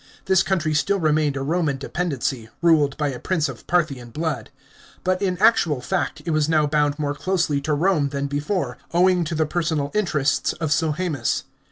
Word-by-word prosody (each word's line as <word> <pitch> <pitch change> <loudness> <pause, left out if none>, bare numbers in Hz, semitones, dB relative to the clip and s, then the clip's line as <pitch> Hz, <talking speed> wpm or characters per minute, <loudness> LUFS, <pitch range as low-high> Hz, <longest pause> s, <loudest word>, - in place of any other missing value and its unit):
This 190 -1 +4
country 170 -6 0
still 150 +7 +1
remained 155 -3 +1
a 135 - -2
Roman 155 -2 0
dependency, 135 -6 -3
ruled 150 -5 +4
by 150 -2 0
a 130 -3 -5
prince 165 -5 0
of - - -9
Parthian 145 -9 0
blood. 150 -3 -3 0.5
But 185 +1 0
in 185 -2 0
actual 175 - +3
fact 150 +4 -2
it 165 - -1
was 155 0 +1
now 155 -2 +3
bound 145 -1 +1
more 145 -2 -1
closely 150 -1 0
to 150 +1 0
Rome 155 -3 +2
than 140 0 -3
before, 145 -1 -2 0.2
owing 180 0 +4
to 160 +1 -3
the 155 0 +2
personal 155 -3 -1
interests 155 -9 +1
of 160 -3 -3
Sohaemus. 155 -4 0
155 Hz, 180 wpm, -22 LUFS, 145-175 Hz, 0.5 s, This